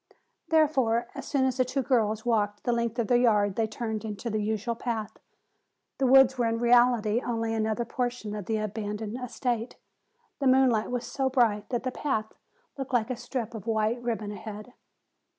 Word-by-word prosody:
Therefore, 270 -8 +2
as 275 - -7
soon 275 -2 +1
as 260 -1 0
the 255 - +4
two 260 +2 -2
girls 220 -4 +1
walked 210 -3 0
the 245 - +1
length 235 0 -1
of 235 - +1
their 245 -1 +4
yard 210 -5 +3
they 225 -1 +1
turned 220 0 -4
into 220 +2 -5
the 215 0 -1
usual 220 +2 -1
path. 225 -2 -4 0.8
The 265 - +3
woods 265 0 +6
were 235 - +2
in 230 0 0
reality 240 -2 +4
only 230 -1 -1
another 220 +1 -1
portion 245 -3 -3
of 210 -3 -6
the 220 - 0
abandoned 215 +2 -4
estate. 240 -1 -2 0.6
The 275 - +1
moonlight 255 -4 +4
was 245 -1 -2
so 265 +2 -1
bright 225 -5 +1
that 240 -1 -2
the 255 - -2
path 220 -6 -2 0.5
looked 270 0 -5
like 240 0 +1
a - - -1
strip 240 -1 -5
of 220 -2 -8
white 220 +2 0
ribbon 225 -3 -3
ahead. 215 +3 -8
235 Hz, 185 wpm, -28 LUFS, 215-250 Hz, 0.8 s, woods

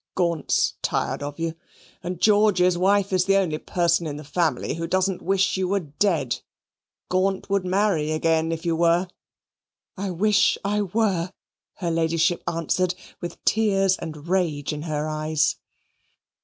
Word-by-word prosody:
Gaunt's 170 -5 +1
tired - - -1
of 145 0 -5
you, 165 -1 -2 0.5
and 180 -1 -5
George's 205 -4 +4
wife 195 +2 +2
is 185 -1 +3
the 195 0 +4
only 165 -6 0
person 170 -1 +1
in 145 -1 -5
the 150 - -8
family 160 +3 -1
who 165 0 -4
doesn't 185 +1 0
wish 195 +1 +1
you 190 -1 0
were 200 +2 +1
dead. 150 -4 0 0.7
Gaunt 190 +1 0
would 200 -2 +1
marry 185 -5 +1
again 160 +1 +1
if 165 +1 -4
you 165 -1 +1
were." 170 +2 +3 0.9
"I 200 0 -3
wish 205 +3 +3
I 210 +1 +1
were," 195 -3 0 0.4
her 175 -4 -2
Ladyship 165 +1 +1
answered 180 +2 0 0.3
with 175 -1 -7
tears 195 -3 +3
and 155 0 -8
rage 165 -6 0
in 150 - -5
her 150 0 -1
eyes. 155 0 0
175 Hz, 150 wpm, -24 LUFS, 160-195 Hz, 0.9 s, George's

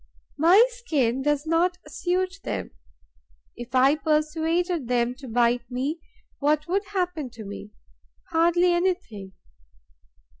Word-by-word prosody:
My 365 +9 +7
skin 290 - -1
does 295 +1 0
not 340 +3 +1
suit 370 +2 -2
them. - - -4 0.8
If 240 +1 -8
I 265 +2 +5
persuaded 315 +1 0
them 245 0 +1
to 270 - -9
bite 240 0 +1
me, 270 +6 -2 0.4
what 300 +2 +1
would 390 +4 0
happen 360 -8 -2
to 225 -3 -11
me? 200 +1 -8 0.6
Hardly 345 +2 +3
anything. 345 - -2
310 Hz, 115 wpm, -25 LUFS, 250-355 Hz, 0.8 s, My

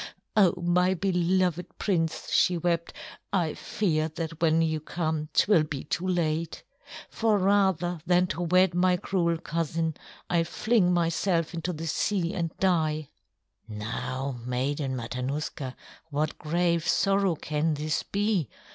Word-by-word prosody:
"Oh, 190 -5 +5
my 180 +2 +2
beloved 180 -1 0
prince," 165 -5 -1
she 180 - +3
wept, 170 0 0 0.4
"I 170 -6 +1
fear 160 -6 -1
that 165 -1 -5
when 165 0 +4
you 160 -1 0
come 155 -1 -3
'twill 200 -1 +4
be 150 -3 -4
too 180 +3 -2
late. 165 -2 -1 0.5
For 220 -2 +2
rather 190 -3 +2
than 180 0 +4
to 175 - -5
wed 180 +1 +3
my 180 +1 +3
cruel 170 -2 0
cousin, 165 0 -2 0.3
I'll 170 -1 +2
fling 215 0 +2
myself 170 0 +1
into 170 +1 -2
the 165 -1 -6
sea 170 +2 0
and 170 -2 -1
die!" 155 -5 +1 0.6
"Now, 120 +5 -4
Maiden 130 +2 -1
Matanuska, 130 +2 -4 0.3
what 150 +1 -2
grave 170 +1 0
sorrow 195 -3 +2
can 155 +1 -1
this 155 +2 -1
be?" 200 - 0
170 Hz, 130 wpm, -27 LUFS, 155-180 Hz, 0.6 s, Oh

